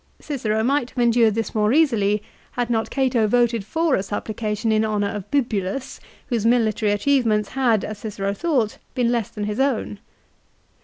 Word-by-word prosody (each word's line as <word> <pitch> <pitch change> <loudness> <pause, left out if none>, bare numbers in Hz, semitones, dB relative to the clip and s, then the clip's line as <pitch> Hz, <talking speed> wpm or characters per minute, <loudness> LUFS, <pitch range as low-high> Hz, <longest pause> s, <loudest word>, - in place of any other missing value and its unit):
Cicero 220 -7 -2
might 265 0 +1
have - - -22
endured 235 -3 +3
this 225 -1 -2
more 215 0 +2
easily 215 -9 +2 0.3
had 245 -1 -2
not 225 -1 0
Cato 255 -5 +1
voted 235 -1 +2
for 320 +8 0
a 190 - +2
supplication 215 +2 -3
in 215 0 +3
honour 210 -2 0
of 205 -3 -6
Bibulus, 240 -2 -2 0.3
whose 235 -5 -1
military 220 -3 +2
achievements 215 -1 +1
had, 240 -6 +1
as 215 -1 -6
Cicero 200 -2 -3
thought, 250 -4 -1 0.2
been 240 -2 +1
less 235 -4 -1
than 210 - -6
his 210 +2 -3
own. 255 -6 0
225 Hz, 165 wpm, -22 LUFS, 210-250 Hz, 0.3 s, endured